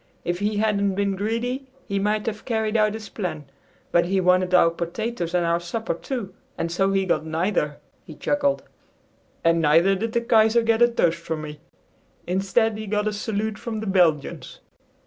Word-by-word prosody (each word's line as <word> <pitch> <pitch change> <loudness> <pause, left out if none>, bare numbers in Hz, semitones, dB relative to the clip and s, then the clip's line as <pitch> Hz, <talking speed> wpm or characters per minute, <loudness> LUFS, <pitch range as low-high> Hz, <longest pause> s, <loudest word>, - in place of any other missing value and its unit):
If 175 0 -1
he 205 +1 -1
hadn't 200 -2 +1
been 200 0 0
greedy, 235 +6 -2 0.2
he 200 -1 -1
might 210 +1 0
have 215 -1 -4
carried 220 -2 -1
out 215 -1 +3
his 220 -1 -7
plan, 180 -7 -5 0.5
but 170 0 +4
he 190 +2 +1
wanted 180 0 +3
our 180 -2 +5
potatoes 175 +2 -3
and 175 -1 +2
our 170 0 +2
supper 175 +6 -3
too; 205 +1 -5 0.2
and 165 - -2
so 195 +3 +1
he 195 -1 +1
got 170 - +1
neither!" 160 -2 -1 0.3
he - - -11
chuckled. 285 -1 0 0.8
"And 165 0 +3
neither 165 +5 +4
did 225 +4 -2
the 235 - +2
Kaiser 230 0 +4
get 225 0 +2
a 240 - +8
toast 170 -8 +1
from 160 -2 -4
me! 150 0 -8 0.7
Instead, 210 +4 +1
he 215 - -6
got 210 +1 0
a 215 - 0
salute 210 +1 -3
from 225 -2 -4
the 220 - -5
Belgians." 175 -7 +1
200 Hz, 185 wpm, -24 LUFS, 175-220 Hz, 0.8 s, a